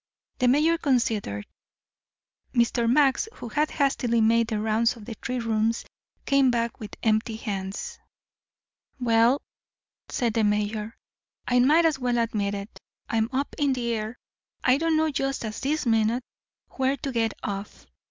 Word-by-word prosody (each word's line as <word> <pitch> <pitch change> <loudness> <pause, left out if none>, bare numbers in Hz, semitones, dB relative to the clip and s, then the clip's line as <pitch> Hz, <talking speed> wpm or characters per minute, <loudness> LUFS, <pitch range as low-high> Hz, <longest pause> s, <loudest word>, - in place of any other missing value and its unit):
The 250 - +3
mayor 310 +6 +3
considered. 225 - 0 1.1
Mr. 235 0 +2
Max, 280 - +3
who 240 - -7
had 300 +7 +1
hastily 260 -5 +1
made 230 +1 +3
the 220 -2 -2
rounds 220 +2 +1
of 220 -3 -12
the 230 - -6
three 250 +3 -4
rooms, 225 0 0 0.4
came 275 -2 +4
back 235 -1 -1
with 210 -2 -8
empty 220 0 +1
hands. 195 -3 -5 1.0
"Well," 235 +2 +3 0.7
said 235 -3 0
the 225 - +1
mayor, 210 +1 -1 0.5
"I 250 0 +3
might 305 +7 +5
as 310 -4 +2
well 245 -1 0
admit 210 -3 0
it. 200 +2 -8 0.3
I'm 225 -1 +1
up 275 +2 -2
in 285 -2 +2
the 235 -2 -1
air. 220 +2 -4 0.5
I 255 +2 +4
don't 325 -1 +2
know 315 0 +2
just 270 -3 -2
at 215 - -4
this 295 +2 -1
minute 225 +2 +2 0.5
where 265 +1 0
to 275 +1 -4
get 225 -3 0
off. 200 0 -5
235 Hz, 150 wpm, -26 LUFS, 220-265 Hz, 1.1 s, might